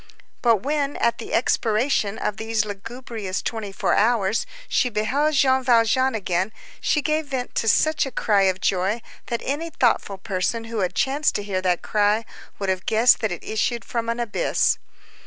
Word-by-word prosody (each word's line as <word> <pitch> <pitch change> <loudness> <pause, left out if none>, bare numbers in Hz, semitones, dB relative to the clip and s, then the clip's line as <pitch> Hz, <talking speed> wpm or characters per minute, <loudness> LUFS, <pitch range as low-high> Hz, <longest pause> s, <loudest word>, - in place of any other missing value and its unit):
But 230 -4 +3
when, 290 0 -1
at 235 - +1
the 230 - -7
expiration 225 -2 +1
of 210 - -2
these 220 0 0
lugubrious 210 -1 -5
twenty 220 -3 -4
four - - 0
hours, 220 -2 +2 0.2
she 250 - +1
beheld 265 +8 0
Jean 265 -1 +3
Valjean 245 +1 +3
again, 185 -1 -1 0.3
she 300 - +1
gave 310 0 0
vent 260 -3 -4
to 225 - -1
such 305 +5 +3
a - - -6
cry 210 -3 +2
of 185 0 -2
joy, 195 +5 0 0.2
that 235 - -3
any 300 +5 -2
thoughtful 235 -8 +1
person 190 +3 -2
who 225 -1 -4
had 185 -2 -1
chanced 280 +3 +1
to 205 - -1
hear 195 -2 -2
that 180 -2 0
cry, 210 +2 +1 0.3
would 195 -1 -2
have 185 0 -2
guessed 225 +3 +5
that 220 -3 -1
it 175 - -5
issued 230 +2 -1
from 230 -1 -3
an 235 +1 -1
abyss. 235 -3 +1
225 Hz, 175 wpm, -23 LUFS, 205-255 Hz, 0.3 s, guessed